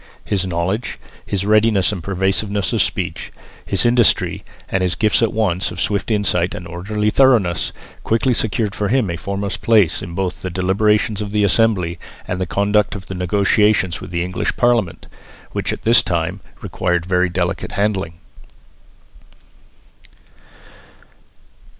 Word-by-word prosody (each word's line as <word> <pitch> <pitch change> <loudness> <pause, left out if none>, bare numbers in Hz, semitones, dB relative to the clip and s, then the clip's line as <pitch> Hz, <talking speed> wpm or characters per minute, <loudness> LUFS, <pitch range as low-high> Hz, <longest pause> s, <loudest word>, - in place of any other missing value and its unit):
His 95 -2 -1
knowledge, 90 +6 -2 0.3
his 100 -1 -2
readiness 105 -2 +3
and 100 -4 -5
persuasiveness 95 +1 -1
of - - +3
speech, - - -2 0.3
his 100 +4 -1
industry 120 -1 +2 0.2
and 95 - -1
his 90 -1 0
gifts 110 +1 +2
at 115 - +2
once 95 -5 0
of - - -8
swift 100 +1 -1
insight 95 -5 +1
and 90 - -7
orderly 105 +5 -2
thoroughness, 110 -12 +3 0.3
quickly 120 +3 +1
secured 110 -2 -1
for 100 +2 -2
him 115 -4 +1
a - - -3
foremost 100 +3 -4
place 105 -8 +3
both 90 +1 -3
in - - -20
the 95 - -4
deliberations 100 +4 +1
of 105 - -4
the 105 0 +1
Assembly 95 -5 +2 0.3
and 90 - -2
in - - -7
the 95 - -2
conduct 100 +2 +1
of 95 -2 -8
the 95 - -7
negotiations 95 -1 +1
with - - -8
the 85 -1 -1
English 90 0 -3
Parliament, 120 -8 +1 0.5
which - - -2
at - - -6
this 115 +1 +6
time 85 +1 -2 0.2
required 90 -2 -1
very 90 0 +1
delicate 85 -1 -2
handling. 100 -4 -1
100 Hz, 150 wpm, -19 LUFS, 90-105 Hz, 0.5 s, this